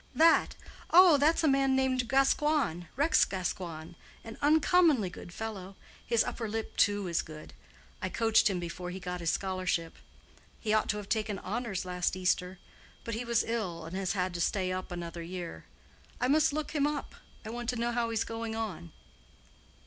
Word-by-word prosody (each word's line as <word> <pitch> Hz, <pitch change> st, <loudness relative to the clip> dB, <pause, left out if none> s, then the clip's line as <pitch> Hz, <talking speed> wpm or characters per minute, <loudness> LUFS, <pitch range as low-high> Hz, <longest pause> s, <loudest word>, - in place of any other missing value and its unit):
"That! 325 Hz, +1 st, +4 dB, 0.3 s
Oh, 355 Hz, -3 st, +8 dB
that's 310 Hz, +4 st, +3 dB
a -, -, +4 dB
man 270 Hz, -1 st, +3 dB
named 260 Hz, -2 st, +1 dB
Gascoigne—Rex 275 Hz, -, +2 dB
Gascoigne. 175 Hz, -4 st, -4 dB, 0.3 s
An 225 Hz, -1 st, -8 dB
uncommonly 305 Hz, -, +4 dB
good 175 Hz, -, -10 dB
fellow; 195 Hz, -2 st, -6 dB, 0.3 s
his 235 Hz, -1 st, +2 dB
upper 225 Hz, -3 st, -4 dB
lip, 225 Hz, +1 st, -4 dB
too, 205 Hz, -1 st, +2 dB
is 170 Hz, -1 st, +1 dB
good. 155 Hz, -1 st, -11 dB, 0.5 s
I -, -, -2 dB
coached 225 Hz, -2 st, +3 dB
him 185 Hz, -2 st, -1 dB
before 175 Hz, +1 st, -5 dB
he 185 Hz, +1 st, -6 dB
got 180 Hz, -1 st, -5 dB
his 170 Hz, -1 st, -1 dB
scholarship. 185 Hz, -3 st, -1 dB, 0.6 s
He 215 Hz, -2 st, -1 dB
ought 215 Hz, -, +2 dB
to 210 Hz, -, 0 dB
have 205 Hz, -1 st, -7 dB
taken 215 Hz, -2 st, -1 dB
honors 205 Hz, -1 st, -3 dB
last 180 Hz, 0 st, -1 dB
Easter. 180 Hz, 0 st, 0 dB, 0.5 s
But 230 Hz, -, -4 dB
he 225 Hz, +3 st, -3 dB
was 235 Hz, -1 st, +1 dB
ill, 185 Hz, -8 st, -3 dB
and 165 Hz, +3 st, -7 dB
has 190 Hz, +1 st, -1 dB
had 185 Hz, -2 st, -1 dB
to 175 Hz, -, -3 dB
stay 185 Hz, 0 st, 0 dB
up 185 Hz, 0 st, -4 dB
another 170 Hz, -1 st, -5 dB
year. 175 Hz, 0 st, -7 dB, 0.5 s
I 250 Hz, -, +1 dB
must 305 Hz, +3 st, +4 dB
look 305 Hz, +1 st, -3 dB
him 290 Hz, -2 st, +1 dB
up. 295 Hz, -1 st, -4 dB, 0.3 s
I 220 Hz, -, -5 dB
want 240 Hz, 0 st, -4 dB
to 250 Hz, -, 0 dB
know 235 Hz, 0 st, -1 dB
how 235 Hz, -1 st, 0 dB
he's 225 Hz, -1 st, 0 dB
going 225 Hz, 0 st, -5 dB
on." 180 Hz, -7 st, -5 dB
215 Hz, 180 wpm, -30 LUFS, 180-250 Hz, 0.6 s, Oh